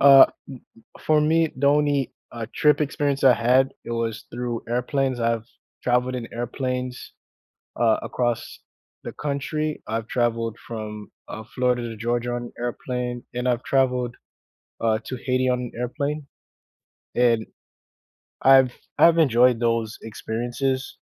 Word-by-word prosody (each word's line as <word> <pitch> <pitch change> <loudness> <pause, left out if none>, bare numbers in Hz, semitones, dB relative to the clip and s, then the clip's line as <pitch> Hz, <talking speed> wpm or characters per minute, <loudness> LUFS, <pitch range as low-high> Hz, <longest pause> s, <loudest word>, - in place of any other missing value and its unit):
Uh, 135 -1 +9
m - - -25 0.5
m - - -17
for 155 -1 +4
me, 160 +1 +2
the 140 +2 +1
only, 145 -2 +2 0.2
uh, 115 -1 -5
trip 150 0 +3
experience 145 -1 0
I 130 -2 +8
had, 125 +3 +3
it - - -5
was 115 -1 -3
through 120 -1 -3
airplanes. 130 +1 0
I've 115 -1 0 0.4
traveled 125 +1 +1
in 120 -2 -5
airplanes, 125 +1 -4 0.6
uh, 115 -2 +3
across 120 -2 -2 0.4
the - - -5
country, 150 +1 -3
I've 110 0 -3
traveled 115 -2 0
from, 105 -3 -6 0.2
uh, 110 - -6
Florida 125 -1 +1
to 115 - -7
Georgia 120 +2 -1
on 120 0 -8
airplane, 120 0 -3
and 125 +1 -1
I've 125 0 0
traveled, 125 -3 +1 0.6
uh, 110 -1 +2
to 130 - -4
Haiti 130 +1 0
on 125 -1 -1
airplane, 145 +4 -3 0.9
and 115 -2 +3 1.0
I've 130 -2 +6 0.2
I've 170 0 +6
enjoyed 125 -5 +4
those 115 -2 0
experiences, 120 +4 -3
125 Hz, 135 wpm, -24 LUFS, 115-135 Hz, 1.0 s, Uh